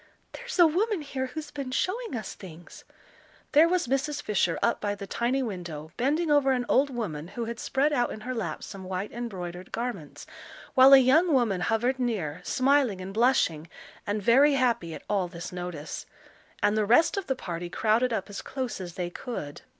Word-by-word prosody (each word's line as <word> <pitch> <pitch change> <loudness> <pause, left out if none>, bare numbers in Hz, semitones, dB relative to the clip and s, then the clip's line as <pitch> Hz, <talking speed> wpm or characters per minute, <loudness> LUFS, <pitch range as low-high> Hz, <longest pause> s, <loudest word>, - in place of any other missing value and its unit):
"There's 485 -2 -7
a 350 - +8
woman 370 +2 +1
here 265 -2 -3
who's 300 +3 -7
been 275 -3 -5
showing 375 - -2
us 215 -4 -5
things." 175 -2 -12 0.7
There 310 +3 +6
was 360 0 +1
Mrs. 275 +3 -1
Fisher 190 -5 0
up 235 - +1
by 205 -1 -1
the 200 0 -7
tiny 245 +6 0
window, 170 -8 -6
bending 300 +6 +1
over 280 -2 +4
an 250 -1 -1
old 280 +2 +3
woman 190 - -4
who 235 +5 -5
had 230 0 -5
spread 285 +3 +1
out 245 -4 +1
in 215 - -7
her 255 +3 -4
lap 190 -10 -4
some 195 -2 -8
white 185 +2 -4
embroidered 185 -6 -6
garments, 230 -11 -5 0.5
while 265 +1 +8
a - - +12
young 290 +7 +4
woman 230 -9 +2
hovered 235 +7 0
near, 185 -10 -2
smiling 255 -3 +2
and 185 +1 -7
blushing, 195 -9 +2 0.4
and 205 0 -1
very 275 +7 +5
happy 235 -11 0
at - - -10
all 195 -3 0
this 170 0 -8
notice. 175 -4 -6 0.6
And 205 - +3
the 215 - +2
rest 245 +10 +4
of 395 -2 -3
the 265 - 0
party 175 -6 -5
crowded 225 +6 +1
up 210 -4 -2
as 205 -2 -7
close 255 -7 -4
as 175 -2 -7
they 175 -1 -3
could. 175 - -6
235 Hz, 190 wpm, -27 LUFS, 185-270 Hz, 0.7 s, a